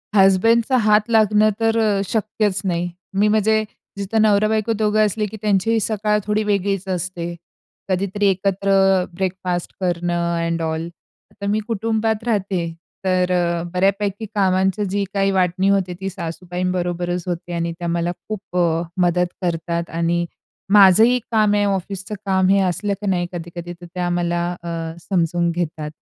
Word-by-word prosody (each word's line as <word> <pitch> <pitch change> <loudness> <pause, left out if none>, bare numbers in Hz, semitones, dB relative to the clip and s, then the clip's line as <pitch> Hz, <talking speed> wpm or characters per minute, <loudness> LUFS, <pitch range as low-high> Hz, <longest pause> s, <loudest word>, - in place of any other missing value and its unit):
हसबँडचा 225 +6 +4
हात 210 +1 +4
लागणं 215 -1 +4
तर 225 0 +2
अ, 210 -3 +2
शक्यच 210 -3 0
नाही. 175 -1 -1 0.2
मी 200 +2 +3
म्हणजे 215 +1 +3 0.3
जिथं 205 +3 0
नवरा-बायको 215 +1 +2
दोघं 215 0 +2
असले 210 +1 -1
की 215 +1 -7
त्यांचीही 215 +2 +2
सकाळ 210 0 0
थोडी 210 +1 0
वेगळीच 200 -2 -1
असते. 175 -1 -3 0.5
कधीतरी 200 +2 0
एकत्र 195 +1 0 0.4
ब्रेकफास्ट 185 -1 -3
करणं 175 -1 -1
एंड 165 0 -1
ऑल 160 +1 -2 0.5
तर 200 - -3
मी 210 +1 +1
कुटुंबात 220 0 -1
राहते, 200 -5 0 0.5
तर 185 -1 +2
अ, 170 -1 +1
बऱ्यापैकी 200 +3 0
कामांची 190 +1 +2
जी 200 +1 0
काही 195 -1 +2
वाटणी 185 0 +1
होते, 190 -2 +1
ती 195 - -2
सासूबाईंबरोबरच 175 0 -3
होते 175 0 -4
आणि 170 0 -1
त्या 175 - -3
मला 170 +1 0 0.2
खूप 205 -4 -6
अ, 165 -2 +2 0.2
मदत 175 0 +1
करतात 170 -1 -2
आणि 170 +1 +1 0.5
माझंही 215 +5 +7
काम 215 -2 +3
आहे 205 - +2
ऑफिसच 195 0 -3
काम, 190 -1 +2
हे 200 0 +5
असलं 185 +2 0
की 205 - -3
नाही 175 -2 0
कधी-कधी 175 0 -6
तर 175 0 -13
त्या 180 -1 -1
मला 175 0 0 0.2
अ, - - -7 0.4
समजून 170 -1 +1
घेतात. 160 -3 -3
190 Hz, 145 wpm, -20 LUFS, 175-210 Hz, 0.5 s, माझंही